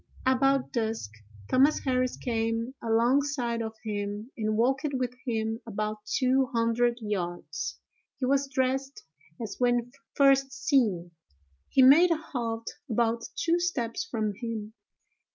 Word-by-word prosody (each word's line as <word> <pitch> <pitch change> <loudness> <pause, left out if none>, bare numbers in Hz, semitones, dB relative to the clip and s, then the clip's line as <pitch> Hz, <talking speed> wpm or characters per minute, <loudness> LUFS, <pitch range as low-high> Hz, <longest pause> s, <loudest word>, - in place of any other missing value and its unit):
About 270 +1 +2
dusk 225 - -2 0.4
Thomas 275 +4 +4
Harris 255 -2 0
came 230 +1 -1
alongside 240 +1 +1
of 220 0 -4
him, 205 +2 -4
and 215 -1 -1
walked 265 +5 +2
with 250 -2 -1
him 225 -1 -1
about 215 0 -3 0.2
two 260 0 +3
hundred 235 -1 +1
yards. 175 - -4 0.4
He 265 - -1
was 275 +1 +1
dressed 265 +1 -1 0.4
as 215 -4 -5
when 245 -1 +1 0.2
first 275 -1 +4
seen. 215 - +1 0.6
He 260 - +5
made 305 +8 +8
a 335 - +2
halt 230 -7 -4 0.2
about 230 0 +1
two 340 +1 +1
steps 265 -10 -1
from 215 -2 -2
him. 220 -1 -5
235 Hz, 125 wpm, -28 LUFS, 220-265 Hz, 0.6 s, made